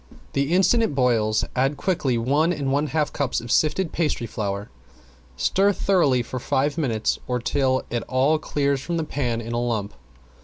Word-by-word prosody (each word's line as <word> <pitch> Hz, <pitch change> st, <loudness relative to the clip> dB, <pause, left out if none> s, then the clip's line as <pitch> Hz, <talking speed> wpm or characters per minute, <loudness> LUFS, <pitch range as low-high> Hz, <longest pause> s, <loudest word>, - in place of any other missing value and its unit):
The 140 Hz, +2 st, 0 dB
instant 190 Hz, +6 st, +4 dB
it 220 Hz, -11 st, 0 dB
boils 115 Hz, -5 st, +2 dB
add 135 Hz, +3 st, +1 dB
quickly 145 Hz, -7 st, 0 dB
one 145 Hz, +8 st, +2 dB
and 140 Hz, -5 st, -2 dB
one 145 Hz, +2 st, +1 dB
half 150 Hz, 0 st, -1 dB
cups 140 Hz, -3 st, -1 dB
of 120 Hz, 0 st, -7 dB
sifted 160 Hz, +3 st, +2 dB
pastry 155 Hz, -7 st, -1 dB
flour. 100 Hz, -3 st, -4 dB, 0.7 s
Stir 195 Hz, -, +3 dB
thoroughly 155 Hz, -12 st, +2 dB
for 130 Hz, +2 st, -5 dB
five 140 Hz, +4 st, 0 dB
minutes, 120 Hz, -9 st, 0 dB
or 125 Hz, -, 0 dB
till 130 Hz, +1 st, 0 dB
it 120 Hz, -, -1 dB
all 135 Hz, +5 st, +2 dB
clears 140 Hz, -3 st, 0 dB
from 170 Hz, +3 st, -3 dB
the 165 Hz, -, 0 dB
pan 125 Hz, -6 st, -2 dB
in 115 Hz, +1 st, -6 dB
a 120 Hz, -, 0 dB
lump. 110 Hz, -4 st, -2 dB
135 Hz, 180 wpm, -23 LUFS, 120-155 Hz, 0.7 s, instant